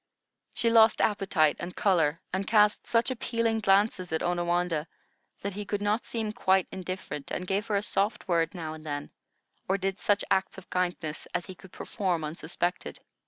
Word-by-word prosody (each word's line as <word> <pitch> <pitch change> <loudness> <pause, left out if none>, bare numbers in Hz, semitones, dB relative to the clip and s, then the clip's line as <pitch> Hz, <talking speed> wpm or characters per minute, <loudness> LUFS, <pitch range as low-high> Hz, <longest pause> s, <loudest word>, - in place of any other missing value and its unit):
She 230 - +2
lost 225 -1 +6
appetite 195 -7 +2
and 175 +1 -6
color, 165 -5 +2
and 190 +1 -1
cast 210 -1 +3
such 230 +2 +2
appealing 230 -2 0
glances 195 -3 +2
at 160 - 0
Onawandah, 175 -2 0 0.6
that 200 0 -2
he 210 +2 -4
could 205 0 -2
not 205 +3 0
seem 220 -2 -2
quite 190 -4 +2
indifferent, 185 -6 -6
and 180 - -3
gave 195 +4 -1
her 210 - 0
a 200 - +1
soft 205 +2 0
word 165 -1 +1
now 160 -3 -4
and 155 -1 -10
then, 145 -2 -5 0.6
or 195 - +3
did 195 0 -2
such 205 0 +2
acts 190 0 +1
of 190 - -12
kindness 175 -4 -2
as - - -1
he 190 - -8
could 185 0 -16
perform 185 -7 -2
unsuspected. 170 +3 -3
190 Hz, 175 wpm, -28 LUFS, 175-210 Hz, 0.6 s, lost